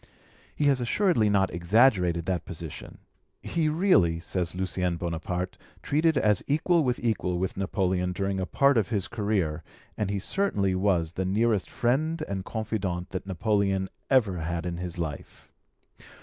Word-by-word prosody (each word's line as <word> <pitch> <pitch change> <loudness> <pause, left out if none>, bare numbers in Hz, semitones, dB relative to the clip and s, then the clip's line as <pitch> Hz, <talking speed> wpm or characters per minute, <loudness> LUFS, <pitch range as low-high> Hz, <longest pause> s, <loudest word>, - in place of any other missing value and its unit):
He - - -1
has 135 -3 +3
assuredly 120 - +2
not 95 -2 +2
exaggerated 90 -2 +3
that 90 -2 -1
position: - - -8 0.5
he 160 -2 0
really, 150 - +3
says 90 0 -3
Lucien 90 -2 -1
Bonaparte, 90 +2 -3 0.2
treated 155 +1 +2
as 105 -6 +3
equal 160 +3 +2
with 125 -2 0
equal 110 -6 -1
with 95 +1 -2
Napoleon 95 -2 0
during 95 +1 -2
a 95 - -2
part 140 -3 +3
of 105 - -1
his 100 -5 -1
career, 100 -8 -1 0.3
and 105 - -2
he 100 - -1
certainly 100 - 0
was 95 -4 +1
the 95 +2 -3
nearest 105 +2 +1
friend 155 +7 0
and 95 -1 -3
confidant 100 -5 -3
that 95 +1 -5
Napoleon 100 0 0 0.2
ever 110 -10 +3
had 85 +1 -3
in 85 -1 -3
his 90 -1 -5
life. 80 -5 -6
95 Hz, 150 wpm, -27 LUFS, 90-120 Hz, 0.5 s, has